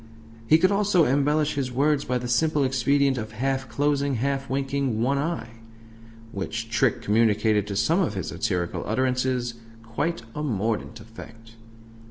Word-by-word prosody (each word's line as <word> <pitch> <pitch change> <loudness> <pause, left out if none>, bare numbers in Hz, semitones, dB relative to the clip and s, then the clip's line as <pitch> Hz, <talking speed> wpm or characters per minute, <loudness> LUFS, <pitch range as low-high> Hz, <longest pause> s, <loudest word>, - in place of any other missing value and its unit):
He 155 - +6
could 185 +4 +3
also 200 -4 +3
"embellish" 145 +3 +1
his 135 -3 -2
words 145 +3 +1
by 125 - 0
the 125 0 -4
simple 145 +4 +2
expedient 135 +1 +2
of 110 0 -6
half 130 +3 -2
closing, 140 -1 0
half 135 +2 -2
winking 135 -3 -1
one 135 +4 +1
eye; 140 -8 -4 0.7
which 115 +3 -5
trick 120 0 +1
communicated 105 -1 +2
to 100 - -4
some 155 - +2
of 110 - -1
his 95 - -4
satirical 85 -2 -2
utterances 125 +1 0 0.3
quite 115 +5 -3
a 150 - -4
mordant 110 -6 -2
effect. 115 0 -13
130 Hz, 150 wpm, -25 LUFS, 115-140 Hz, 0.7 s, He